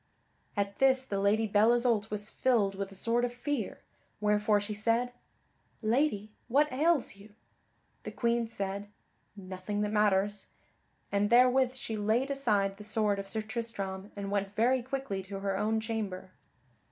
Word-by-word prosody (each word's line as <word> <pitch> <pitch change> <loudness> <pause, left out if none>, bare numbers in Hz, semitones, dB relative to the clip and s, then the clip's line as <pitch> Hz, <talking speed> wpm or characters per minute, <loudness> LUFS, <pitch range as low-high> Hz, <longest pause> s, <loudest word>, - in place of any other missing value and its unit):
At 200 0 -1
this 265 -1 +4
the 200 -6 -3
Lady 210 +3 +3
Belle 215 +2 +4
Isoult 235 -3 +1
was 210 0 -3
filled 225 -7 +2
with 195 0 -5
a - - -11
sort 230 +5 +1
of 245 - 0
fear, 245 -2 -3 0.4
wherefore 210 0 +3
she 205 +1 -4
said, 230 +3 +1 0.7
"Lady, 215 -2 +1 0.2
what 290 +5 +3
ails 295 -6 +2
you?" 205 +1 -16 0.7
The - - -6
Queen 235 -1 0
said, 200 -2 -4 0.5
"Nothing 190 +1 -4
that 210 0 -1
matters," 205 -1 +2 0.6
and 205 +1 +2
therewith 255 +2 +5
she 225 -4 -4
laid 225 +6 +1
aside 205 -8 +1
the 210 - -9
sword 210 -1 +1
of 195 - -5
Sir 220 +2 -2
Tristram 210 -4 -5
and 200 -1 -5
went 200 0 -1
very 250 +3 +3
quickly 260 -6 -3
to 195 +1 -7
her 195 -1 -1
own 220 +3 +1
chamber. 215 -5 -4
215 Hz, 155 wpm, -30 LUFS, 200-240 Hz, 0.7 s, therewith